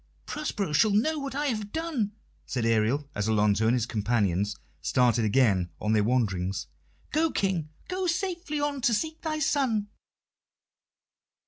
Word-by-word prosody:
"Prospero 210 - -3
shall 215 +8 +5
know 265 +10 +2
what 275 -1 -5
I 295 +1 0
have 215 -6 -2
done," 300 -11 -2 0.3
said 125 -3 -1
Ariel, 115 +6 +2
as 105 +1 -1
Alonso 105 0 +3
and 120 - +4
his 120 -3 0
companions 105 -4 0 0.3
started 120 -2 +3
again 100 -6 +3
on 105 +1 0
their 105 -1 +3
wanderings. 95 -6 0 0.5
"Go, 320 +2 +2
King 185 - -1 0.2
go 370 0 -2
safely 345 -3 -2
on 290 -2 -1
to 235 -2 +3
seek 315 +7 -3
thy 315 -1 -2
son." 255 -8 +1
175 Hz, 145 wpm, -28 LUFS, -, 0.5 s, shall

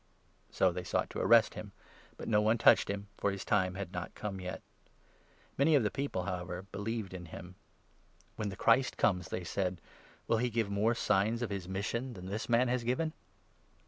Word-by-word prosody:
So - - +3
they - - -4
sought - - -1
to - - -4
arrest - - +5
him; - - -8 0.4
but - - -7
no 105 -1 +4
one 110 +2 +3
touched - - +5
him, 100 0 -3
for 100 - +2
his 100 -1 -4
30 - - -22
time 95 -3 +3
was 100 0 -4
not 90 0 -5
come 100 -3 -5
yet. 90 0 -6 1.0
Many 150 +3 +5
of 135 - +4
the 105 - 0
people, 140 -10 -2
however, 90 -1 -4
31 - - -22
believed 105 -1 -3
in 90 -1 -7
him. 90 +2 -9 0.8
"When 105 -2 -2
the 95 - -6
Christ 115 +6 +3
comes," 90 -4 +1
they 90 - -3
said, 90 0 -2 0.5
"will 115 - +3
he 125 +1 +1
give 110 -3 -1
more 105 +4 +2
signs 110 +2 +1
of 110 - -3
his 95 -3 -4
mission 115 +7 -2
than 90 -1 -9
this 100 +5 -4
man 120 +2 +4
has 125 0 0
given 140 +7 0
100 Hz, 205 wpm, -32 LUFS, 95-115 Hz, 1.0 s, arrest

